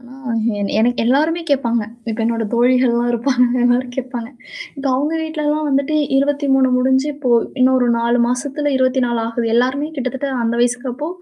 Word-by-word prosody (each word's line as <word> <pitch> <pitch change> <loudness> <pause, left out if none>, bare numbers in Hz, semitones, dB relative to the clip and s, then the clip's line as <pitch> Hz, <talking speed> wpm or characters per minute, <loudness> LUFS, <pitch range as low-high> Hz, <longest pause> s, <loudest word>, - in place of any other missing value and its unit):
ஆ - - -20 0.6
என 200 - -2
எனக்கு 240 0 +1
எல்லாருமே 310 +7 +2
கேப்பாங்க. 235 -5 +1 0.3
இப்ப 225 +1 -4
என்னோட 230 0 -1
தோழிகள்லாம் 240 0 +2
இருப்பாங்க. 250 +2 +2 0.2
எல்லாரும் 245 +1 +1
கேப்பாங்க. 250 -3 -5 0.5
இப்ப 275 0 -5
அவங்க 290 +4 -1
வீட்லலாம் 305 -1 -2
வந்துட்டு 280 +2 0 0.2
23 275 -2 +2
முடிஞ்சு 265 +2 +2
இப்போ 280 -3 -3 0.3
இன்னொரு 255 -1 +3
4 230 - -1 0.2
மாசத்துல 270 +5 -1
24 255 -2 +1
ஆகுது. 230 0 -3
எல்லாருமே 260 +5 +1
கிட்டத்தட்ட 265 +1 -3 0.2
அந்த 230 0 0
வயசுக்கப்போ, 245 +4 -1
255 Hz, 145 wpm, -18 LUFS, 240-280 Hz, 0.6 s, இன்னொரு